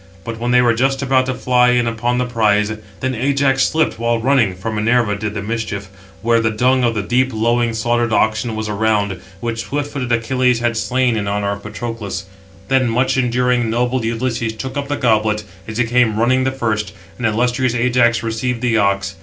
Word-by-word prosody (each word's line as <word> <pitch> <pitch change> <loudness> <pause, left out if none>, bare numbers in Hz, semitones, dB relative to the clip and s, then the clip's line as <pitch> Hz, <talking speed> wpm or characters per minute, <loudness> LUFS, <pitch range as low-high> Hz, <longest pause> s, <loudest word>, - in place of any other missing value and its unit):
But 115 +1 -6
when 120 +1 -2
they 125 0 +4
were 120 -1 +4
just 135 +3 0
about 130 -1 +2
to 130 - -1
fly 125 -1 +3
in 120 -1 +2
upon 120 +1 -1
the 125 - 0
prize, 110 -3 +1 0.3
then 130 0 -1
Ajax 135 +2 +1
slipped, 155 -8 0
while 115 0 +1
running 115 -6 +2
(for 100 +5 -5
Minerva 110 0 +1
did 105 +1 -4
the 100 - -3
mischief), 105 -3 -4 0.3
where 115 0 +3
the 115 0 +1
dung 125 +4 +2
of 115 -1 +1
the 105 - -1
deep 130 +4 +1
lowing 115 +1 +1
slaughtered 120 +1 0
oxen 110 +1 +1
was 110 0 -3
around, 105 -3 0 0.2
which 115 -1 -3
swift 145 0 -3
footed 125 -3 -3
Achilles 125 +1 +1
had 120 -1 0
slain 125 +1 +1
in 105 -2 -2
honour 100 0 -1
of 100 0 -5
Patroclus. 105 -3 -5 0.4
Then 130 -2 +2
much 125 +3 +1
enduring, 125 -1 +1
noble 125 +2 0
Ulysses 115 0 -2
took 130 +5 -6
up 140 -1 -3
the 145 0 -2
goblet, 110 -3 +1 0.2
as 110 0 -6
he 120 - +3
came 115 -2 +2
running 130 +3 +2
the 130 - +1
first; 110 -6 -2 0.3
and 120 - +1
illustrious 125 +2 0
Ajax 120 -1 +2
received 115 +2 -2
the 120 -2 +1
ox. 100 -1 +1
115 Hz, 200 wpm, -18 LUFS, 110-125 Hz, 0.4 s, they